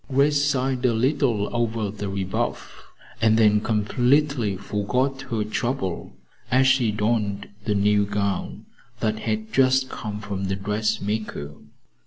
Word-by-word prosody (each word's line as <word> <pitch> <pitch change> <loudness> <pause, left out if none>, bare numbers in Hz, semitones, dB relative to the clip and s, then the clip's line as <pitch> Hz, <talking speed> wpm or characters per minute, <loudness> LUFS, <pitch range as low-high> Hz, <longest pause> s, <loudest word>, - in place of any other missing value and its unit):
Grace 140 +2 +3
sighed 135 -2 0
a 125 -2 +3
little 125 -4 +1
over 115 -3 -1
the 105 -1 -5
rebuff, 95 -1 -3 0.4
and 110 0 +4
then 105 -2 +4
completely 120 +1 +1
forgot 125 +7 -1
her 110 -2 0
trouble 110 -3 -3 0.3
as 130 +1 +4
she 130 -4 +3
donned 105 -2 -1 0.2
the 105 - +1
new 105 +1 +3
gown 100 -1 -2 0.3
that 110 -2 -1
had 110 0 -3
just 130 0 +3
come 105 -1 -5
from 100 -2 -4
the 95 0 -1
dressmaker. 105 -5 -2
110 Hz, 130 wpm, -24 LUFS, 105-130 Hz, 0.4 s, and